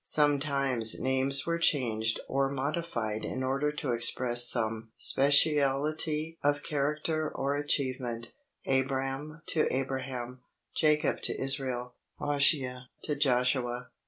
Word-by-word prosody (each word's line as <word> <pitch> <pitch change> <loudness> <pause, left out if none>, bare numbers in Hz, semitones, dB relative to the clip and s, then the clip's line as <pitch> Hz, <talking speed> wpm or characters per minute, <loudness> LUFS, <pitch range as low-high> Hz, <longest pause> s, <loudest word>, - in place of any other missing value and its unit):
Sometimes 140 -6 +3
names 130 +1 +1
were 170 0 -1
changed 115 -8 +1
or 135 0 0
modified 135 -6 -3
in 130 - -4
order 140 +3 0
to 145 -3 -3
express 120 +1 +2
some 110 -2 +1
speciality 150 +3 +2
of 145 0 +1
character 150 +2 -1
or 140 +1 -2
achievement 130 -5 -2 0.3
Abram 135 +3 -2
to 155 - +2
Abraham, 130 -1 -4 0.3
Jacob 150 -1 +2
to - - -2
Israel, 130 -3 -2 0.2
Hoshea 140 -3 +1 0.2
to 150 - -1
Joshua. 125 -2 0
135 Hz, 105 wpm, -29 LUFS, 125-145 Hz, 0.3 s, Sometimes